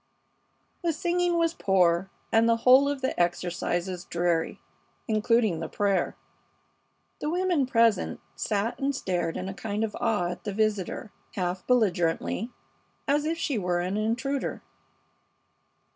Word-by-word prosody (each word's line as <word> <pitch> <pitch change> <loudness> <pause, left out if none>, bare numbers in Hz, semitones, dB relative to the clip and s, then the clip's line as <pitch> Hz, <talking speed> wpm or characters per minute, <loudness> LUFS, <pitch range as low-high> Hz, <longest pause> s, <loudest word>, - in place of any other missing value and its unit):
The 340 -2 +1
singing 350 +1 +1
was 330 -1 +2
poor, 185 - +2 0.2
and 225 +1 +4
the 230 - +5
whole 265 +3 +7
of 285 -2 -3
the 260 - +1
exercises 175 +1 -1
dreary, 170 -1 0 0.5
including 215 -4 +2
the 165 - -4
prayer. 200 -3 0 1.0
The - - -3
few - - 0
women 355 -7 +1
present 230 -5 +2 0.2
sat 210 +2 -1
and 280 0 0
stared 175 -7 -1
in 185 - -4
a 195 - -4
kind 210 +2 -3
of 215 -2 -3
awe 210 -7 +1
at 180 - -8
the 205 - -3
visitor, 210 -1 -1 0.2
half 185 -1 -2
belligerently, 200 -2 +1 0.6
as 290 +1 +2
if 325 +1 -1
she 280 -8 -1
were 180 -2 0
an 185 +3 -2
intruder. 240 +6 -1
215 Hz, 140 wpm, -27 LUFS, 180-265 Hz, 1.0 s, whole